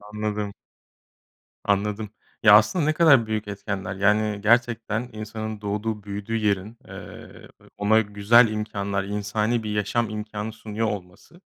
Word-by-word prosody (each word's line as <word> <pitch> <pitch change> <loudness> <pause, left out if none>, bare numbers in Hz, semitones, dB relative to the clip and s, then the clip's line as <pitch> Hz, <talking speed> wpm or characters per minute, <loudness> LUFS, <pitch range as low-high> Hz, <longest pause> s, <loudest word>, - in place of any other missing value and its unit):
Anladım. 105 -1 -4 1.1
Anladım. 105 +1 0 0.3
Ya, 105 -2 +8
aslında 110 - +4
ne 155 - +2
kadar 145 -8 +5
büyük 110 -1 -2
etkenler. 100 -1 -4
Yani 105 +1 +1
gerçekten 115 +1 +1
insanın 110 0 -6
doğduğu, 105 +1 -3
büyüdüğü 100 +2 -4
yerin, 105 0 -1
eee, - - -11 0.3
ona 105 +2 +4
güzel 105 +3 +4
imkânlar, 100 -2 -3
insani 105 +3 -1
bir 105 - -3
yaşam 105 +2 0
imkânı 105 0 -5
sunuyor 110 0 -3
olması, 100 - -8
105 Hz, 125 wpm, -24 LUFS, 105-110 Hz, 1.1 s, Ya